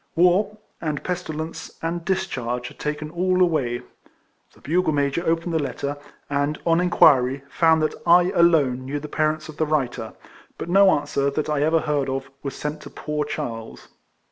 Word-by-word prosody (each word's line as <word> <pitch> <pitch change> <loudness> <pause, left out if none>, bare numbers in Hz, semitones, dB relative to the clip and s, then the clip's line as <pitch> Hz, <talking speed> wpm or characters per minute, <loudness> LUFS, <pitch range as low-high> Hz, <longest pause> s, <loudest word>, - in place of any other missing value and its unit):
War, 185 +5 +3 0.2
and 150 -3 -3
pestilence, 165 -3 -5
and 165 +1 -3
discharge, 125 -10 -2
had - - -17
taken 150 0 -3
all 185 +2 +1
away. 140 -9 +1 0.7
The - - -21
bugle 165 +2 +1
major 145 +3 0
opened 165 +1 0
the 160 - +1
letter; 140 0 -3 0.3
and, 145 +1 -1
on 165 0 +3
inquiry, 135 -6 +4
found 160 -1 +3
that 155 - 0
I 175 +1 +6
alone 150 -7 +3
knew 140 +3 -3
the 150 - -7
parents 155 +1 -1
of 155 -1 -10
the 155 - 0
writer; 130 -7 -1 0.4
but - - -6
no 195 +2 +6
answer, 145 -3 +1
that 150 +2 -2
I 145 -2 +1
ever 160 +2 +3
heard 145 -3 0
of, 135 0 -4
was 140 - -5
sent 150 +1 -4
to - - -10
poor 150 -1 -3
Charles. 115 -7 -6
155 Hz, 170 wpm, -23 LUFS, 140-170 Hz, 0.7 s, I